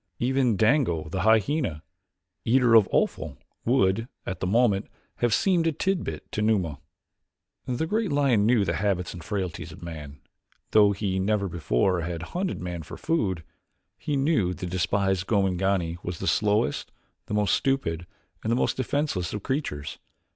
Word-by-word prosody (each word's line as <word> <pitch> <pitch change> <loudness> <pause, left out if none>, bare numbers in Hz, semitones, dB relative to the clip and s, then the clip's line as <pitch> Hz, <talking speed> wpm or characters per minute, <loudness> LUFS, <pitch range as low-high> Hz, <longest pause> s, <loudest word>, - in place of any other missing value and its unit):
Even 125 -3 +1
Dango, 110 - +2
the 95 +3 -2
hyena, 110 - +2 0.6
eater 125 0 +4
of 110 -4 +7
offal, - - 0 0.3
would, 115 -2 +2 0.2
at 95 - -4
the 90 - -1
moment, 105 -1 +2 0.3
have 120 -1 +1
seemed 170 - +3
a - - +3
tidbit 190 +4 -2
to 110 - -2
Numa. 95 -10 +1 0.9
The 125 +5 -1
great 210 +1 0
lion 135 -8 +3
knew 115 -4 +4
the 85 -3 -1
habits 95 -3 -1
and 85 -3 -9
frailties 95 -6 -4
of 80 - -12
man, 75 -4 -8 0.5
though 105 -1 +6
he 100 -1 -1
never 100 +1 +1
before 85 +1 +1
had 85 0 -4
hunted 185 +1 -2
man 90 -1 -4
for 75 - -9
food. 95 - -1 0.5
He 150 -3 -3
knew 135 - +1
the 90 - -6
despised 95 +1 0
Gomangani 95 -4 +1
as 90 -1 -4
the - - -5
slowest, 105 -6 +1 0.4
the 105 - -2
most 105 -1 +2
stupid, 85 -12 0 0.3
and 110 - -1
the - - +3
most - - 0
defenseless 130 - -1
of 105 - -4
creatures. 130 - -3
100 Hz, 155 wpm, -26 LUFS, 90-125 Hz, 0.9 s, of